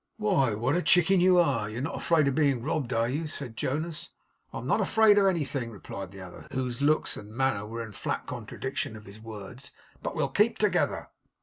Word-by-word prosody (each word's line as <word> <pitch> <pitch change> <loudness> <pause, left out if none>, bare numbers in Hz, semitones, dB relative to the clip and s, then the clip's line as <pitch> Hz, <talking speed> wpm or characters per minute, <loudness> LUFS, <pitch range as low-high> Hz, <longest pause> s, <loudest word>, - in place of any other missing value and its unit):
'Why, 180 - +2
what 120 +8 0
a 180 - +2
chicken 180 +1 +4
you 180 0 +5
are! 130 -11 +2
You 110 - -6
are - - -2
not 150 - -3
afraid 160 -4 +3
of 140 - +2
being 140 -5 +2
robbed; 130 -4 -1
are 115 -1 +2
you?' 150 +6 -2
said 140 -6 -7
Jonas. 160 +7 -3 0.4
'I - - -6
am - - -6
not - - +2
afraid 220 -2 +5
of 195 - +4
anything,' 145 -9 -1
replied 100 -3 -8
the 95 0 -11
other, 90 -1 -11
whose 125 -1 -2
looks 150 +2 +2
and 105 - -9
manner 120 -3 0
were 115 +1 -5
in 110 - -9
flat - - -3
contradiction - - -4
to 110 - -9
his 105 +1 -13
words. 115 +5 -9 0.3
'But - - -4
we'll - - 0
keep - - +2
together. - - +1
130 Hz, 215 wpm, -28 LUFS, 110-160 Hz, 0.4 s, you